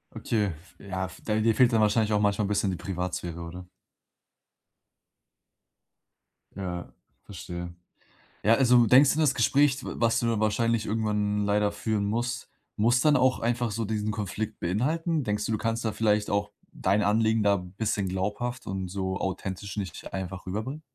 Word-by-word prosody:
Okay, 105 -4 0 0.3
ja 95 -1 -4
f - - -13
da 105 - +1
dir 115 +1 +3
fehlt 125 +1 +4
dann 110 - +4
wahrscheinlich 105 0 +2
auch 105 - +2
manchmal 100 0 +2
'n - - -2
bisschen 100 -1 +1
die 90 - -4
Privatsphäre, 90 -2 -4
oder? 90 +2 -8 2.9
Ja, 90 -3 -5 0.3
verstehe. 90 -2 -7 0.7
Ja, 110 - +5
also, 125 -2 +5
denkst 130 +5 +6
du 155 - -2
das 150 -4 +4
Gespräch, 140 +3 +3
d - - -10
was 115 -1 +2
du 115 -2 0
wahrscheinlich 110 +1 +1
irgendwann 105 -1 0
leider 105 0 +2
führen 105 0 -1
musst, 120 +4 -2 0.3
muss 120 +3 +3
dann 150 -1 +4
auch 130 -1 +3
einfach 120 0 0
so 115 +2 -2
diesen 105 0 -1
Konflikt 105 +1 -4
beinhalten? 150 - 0
Denkst 105 -2 -1
du, - - -2
du - - +1
kannst 115 +2 -2
da 110 - +1
vielleicht 105 -1 +1
auch 100 +1 0 0.2
dein 100 +3 +1
Anliegen 110 +2 +2
da 100 -1 +4
bisschen 100 +2 -2
glaubhaft 105 +7 -3
und 95 -1 -3
so 95 0 -2
authentisch 95 +1 -4
nicht 95 -5 -6
einfach 95 0 -5
rüberbringen? 110 +11 -4
105 Hz, 165 wpm, -27 LUFS, 95-115 Hz, 2.9 s, denkst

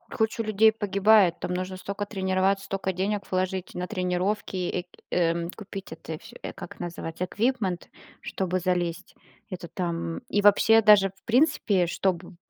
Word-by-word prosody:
куча 220 0 0
людей 215 +1 +4
погибает. 205 -3 +3
Там 180 - -3
нужно 185 +1 -3
стока 200 +2 -4
тренироваться, 195 0 0
стока 195 -1 -2
денег 200 +2 -1
вложить 185 0 -1
на 180 0 -3
тренировки 185 0 -1
и, 180 0 -2 0.2
э, 170 0 +1
купить 200 -2 -8
это 160 -1 -7
всё, - - -13
э, - - -5
как - - -10
называется, 170 0 -5
equipment, 205 -4 -1 0.3
чтобы 185 -1 -2
залезть. 175 -2 -2 0.3
Это 180 -2 -6
там. 170 -2 -3
И 205 - +2
вообще, 225 +2 +6
даже 205 -2 +6
в - - -29
принципе, 230 - +3
чтобы 175 +1 -2
190 Hz, 150 wpm, -26 LUFS, 180-205 Hz, 0.3 s, вообще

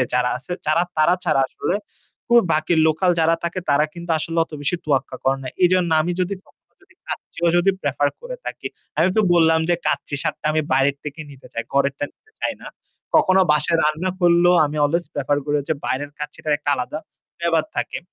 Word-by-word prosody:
যারা 125 0 +2
আছে 145 - -8
যারা 155 +3 +3
তারা 155 +3 +4
ছাড়া 155 -5 +2
আসলে - - -2 0.5
খুব 235 0 +7
বাকি 155 +3 +1
লোকাল 160 +4 +2
যারা 165 +1 +4
থাকে 170 +2 -2
তারা 145 +1 +4
কিন্তু 170 0 -8
আসলে 165 +1 -3
অত 165 - -26
বেশি 145 +5 0
তোয়াক্কা 135 -3 0
করে 135 0 +2
না। - - -4 0.2
এজন্য 180 -1 +3
আমি 175 - -1
যদি 185 +2 0
কখন - - -28
ও - - -43
যদি - - -24
কাচ্চি - - -7
ভাই 170 -1 +3
যদি 195 +3 +4
প্রেফার 145 0 +1
করে - - -7
থাকি। - - -5 0.3
আমি 170 +4 +4
তো - - +6
বললাম 160 -1 +4
যে 175 - +5
কাচ্চি - - -1
স্বাদটা 155 -1 -3
আমি 155 - +2
বাইরের 135 +1 +3
থেকে 150 +1 -6
নিতে 135 -1 -14
চাই। 115 - -3
ঘরেরটা 140 +1 +1
নিতে 435 - -32
চাই - - -1
না। - - -8 0.5
কখনো 185 +1 +4
বাসায় 165 +2 +2
রান্না 155 +5 0
করলেও 175 0 +5
আমি 150 - -6
অলওয়েজ 170 +4 0
প্রেফার 145 0 0
করি 150 0 0
যে 160 - +3
বাইরের 140 +2 -2
কাচ্চিটা 150 +1 -5
একটা 145 - -2
আলাদা 130 +3 -4 0.4
flavor - - -20
ব্যাপার 165 -2 +2
থাকে। - - -2
155 Hz, 205 wpm, -21 LUFS, 145-175 Hz, 0.5 s, খুব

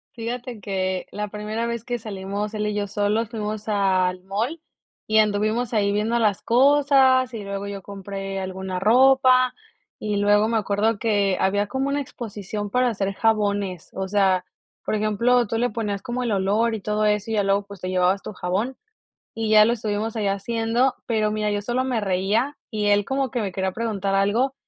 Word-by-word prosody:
Fíjate 240 0 -5
que, 185 -1 -2
la 210 0 -3
primera 215 +2 -3
vez 235 -1 -3
que 245 0 -3
salimos, 205 -1 -5
él 210 -1 -1
y 210 - -2
yo 205 -1 -1
solos, 205 +2 0
fuimos 215 -2 -4
al 185 -3 +1
mall, 225 - -3 0.5
y 220 - +2
anduvimos 215 +3 +1
ahí 205 -2 +2
viendo 215 +3 0
las 210 -4 +1
cosas. 265 0 +4
Y 220 -3 -5
luego, 200 0 -4
yo 200 -1 -6
compré 195 0 -6
alguna 190 0 -4
ropa. 255 +3 +5 0.4
Y 210 -1 -2
luego, 205 +1 +3
me 230 0 +1
acuerdo 210 +1 0
que, 205 -4 +1
había 205 +2 +2
como 265 +6 -2
una 285 +1 0
exposición 210 -6 -6
para 250 +4 +2
hacer 195 -3 -2
jabones. 205 -5 0
O 190 0 -3
sea, 190 -2 +2 0.4
por - - -1
ejemplo, 215 +3 +2
tú 225 - -2
le 245 +1 0
ponías 205 -3 -3
como 245 +1 -3
el 240 -2 -1
olor, 210 +4 +1
y 215 - -6
todo 210 +1 0
eso, 210 +1 0
y - - 0
ya 210 -2 +2
luego, 195 +1 +1
pues 200 -2 -12
te 185 - -3
llevabas 185 +1 +2
tu - - -7
jabón. 200 +8 -2 0.6
Y 225 -1 -2
ya 215 -1 +7
lo 235 - +2
estuvimos 215 -1 -3
ahí 215 -3 -1
haciendo. 230 +5 0
Pero 215 -2 +1
mira, 215 0 -1
yo 205 0 -2
solo 245 +4 0
me 250 -4 -1
reía, 205 +8 0
y 210 -2 -1
él, 205 0 +4
como 270 +2 -1
que 240 - -1
me 200 -3 -2
quería 190 +1 -1
preguntar 200 -2 -2
algo. 210 +7 +2
210 Hz, 190 wpm, -23 LUFS, 200-230 Hz, 0.6 s, ya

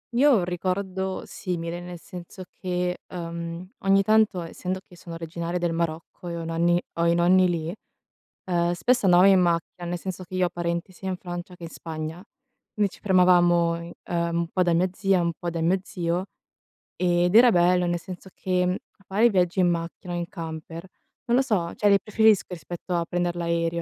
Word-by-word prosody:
Io 285 +4 +5
ho 245 - +6
un 180 - 0
ricordo 185 +1 -2
simile, 170 -1 -4
nel 175 -1 -8
senso 180 +2 -10 0.2
che, 180 -1 -2
ehm, 170 0 -6
ogni 195 0 +3
tanto 215 -3 +3
essendo 180 +3 -4
che 180 - -16
sono 170 -1 -9
originaria 170 +1 -4
del 175 -1 -1
Marocco 165 +1 -4
e 170 - -4
ho - - -4
i - - -6
nonni 170 +1 +2 0.2
ho 170 - +3
i 170 - +3
nonni 180 +1 +4
lì, 165 0 -2 0.7
ehm, 175 -1 +1
spesso 245 +6 +1
andavamo 180 +1 +7
in 190 -1 +6
macchina, 175 0 0
nel 175 +1 -2
senso 185 +1 -6
che 185 +1 -8
io 185 -1 +2
ho - - -6
parenti 170 +1 -3
sia 190 +1 -8
in 185 - -1
Francia 175 0 -7
che 175 - -13
in 165 - -6
Spagna, 160 +1 -6 0.5
quindi 205 -2 +1
ci - - -15
fermavamo 175 -3 +4
in 170 - -9
ehm, 170 -1 -1
un 170 0 0
po' 185 - +1
da 175 -1 +2
mia 180 +3 +2
zia 195 0 +1
e - - +2
un 170 0 +1
po' 175 - -2
da 165 -1 -3
mio 175 +4 +2
zio, 175 -1 -2 0.7
ed 175 0 +2
era 240 +3 +8
bello, 180 -1 +3
nel 175 0 0
senso 185 +2 -9
che, 180 -1 0
mhmm, 180 - +1 0.2
a 195 - -24
fare 215 +5 +4
viaggi 185 -2 +2
in 180 - +4
macchina 170 +1 -4
o - - -2
in 170 0 -3
camper, 165 0 -7 0.4
non 240 +1 +3
lo - - +5
so, 185 -9 -1
cioè 210 - +1
li 200 -1 +6
preferisco 220 -1 +3
rispetto 175 +1 -6
a 170 -1 0
prender 175 0 -1
l'aereo 170 0 0
175 Hz, 210 wpm, -25 LUFS, 170-185 Hz, 0.7 s, era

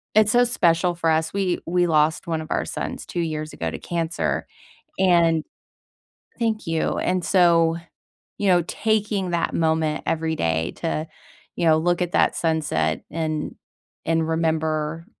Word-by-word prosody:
it's 215 0 +5
so 245 0 +5
special 175 -6 +2
for 165 -1 0
us. 160 0 0
We 190 -3 0
we 175 +1 +2
lost 155 0 +2
one 165 -1 -1
of 155 - -9
our - - +1
sons - - -5
2 175 - -5
years 155 -2 -3
ago 80 - -3
to - - -5
cancer 170 -1 -2 0.5
and 170 -4 +3 1.0
Thank 225 -4 -1
you. 165 -1 0
And 180 -1 0
so, 170 -3 +4 0.6
you 205 - -1
know, 175 -2 +4
taking 210 -4 0
that 170 - 0
moment 160 -1 +1
every 160 0 0
day 80 - 0
to, 160 -1 -2 0.5
you 175 - -1
know, 160 -1 +5
look 175 +2 +1
at 175 - -4
that - - +3
sunset 150 - 0
and 155 -1 -3 0.5
and 165 0 +1
remember, 160 0 -1
165 Hz, 155 wpm, -23 LUFS, 160-175 Hz, 1.0 s, it's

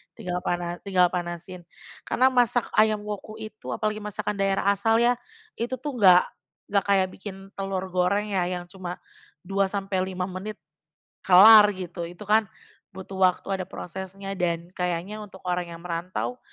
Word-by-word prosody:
tinggal 180 0 -3
pana 175 -1 -3
tinggal 180 -3 +2
panasin. 175 0 -5 0.4
Karena 260 +1 +3
masak 245 -1 +2
ayam 215 -1 +3
Woku 210 +1 -6
itu, 215 -1 -7
apalagi 215 0 -2
masakan 210 -1 -4
daerah 195 0 +2
asal 210 +3 +2
ya. 245 0 +3 0.4
Itu 240 +3 -1
tuh, 260 0 -6
nggak 180 -3 +7 0.5
nggak 200 -2 +2
kayak 195 -2 +3
bikin 195 0 -10
telur 195 -1 -2
goreng, 200 +4 +1
ya. 185 -3 +1
Yang 180 +1 -6
cuma, 180 -1 -4 0.5
2 195 0 +1
sampai 195 -1 -2
5 185 -1 -3
menit, 190 +3 -6 0.7
kelar, 210 +3 +9
gitu. 175 -2 -6
Itu 175 +4 -10
kan 215 +1 +3 0.5
butuh 190 0 -8
waktu, 185 -1 +2
ada - - -5
prosesnya, 190 +2 -7
dan 170 -1 -1
kayaknya 180 +4 -3
untuk 195 -2 -12
orang 180 -1 -1
yang 165 - -9
merantau, 180 +8 -4
195 Hz, 155 wpm, -25 LUFS, 180-210 Hz, 0.7 s, kelar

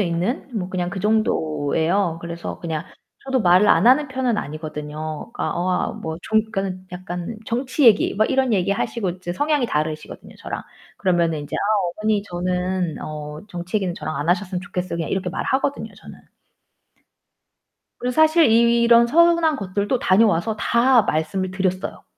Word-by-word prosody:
있는? 180 +9 -1
뭐 185 -3 -2
그냥 180 -1 -2
그 190 - -5
정도예요. 170 -4 0
그래서 170 0 -6
그냥 165 -1 -3 0.4
저도 265 -1 0
말을 185 +1 +5
안 - - +4
하는 270 +4 +5
편은 255 -3 -1
아니거든요. 155 +1 -6
그니까 - - -2
어 180 +2 0
아 180 - 0
뭐 160 0 -6
좀 220 - +2
그러니까는 190 -2 -3
약간 180 +3 -6
정치 255 +5 -1
얘기 225 -4 +5
막 215 +2 +1
이런 265 -2 +2
얘기 195 -2 +1
하시고 210 0 -1
이제 175 0 -6
성향이 290 - +1
다르시거든요, 155 -3 -4
저랑. - - -6 0.4
그러면은 170 -4 +1
인제 145 - -5
"아 - - -2 0.4
어머니 215 -1 +1
저는 180 -2 -2
어 150 0 -7
정치 175 +1 -4
얘기는 190 -4 -1
저랑 155 -3 -5
안 145 +3 -3
하셨으면 185 0 0
좋겠어요." 180 -2 -4
그냥 165 - -3
이렇게 190 -1 -1
말하거든요, 270 +8 -2
저는. - - -13 1.8
그리고 250 0 -2
사실 315 +4 +5
이런 235 +1 +5
서운한 335 +1 +4
것들도 200 +5 -1
다녀와서 210 0 +2
다 240 +1 +4
말씀을 185 +2 -1
드렸어요. 185 0 -3
185 Hz, 365 characters per minute, -22 LUFS, 170-230 Hz, 1.8 s, 말을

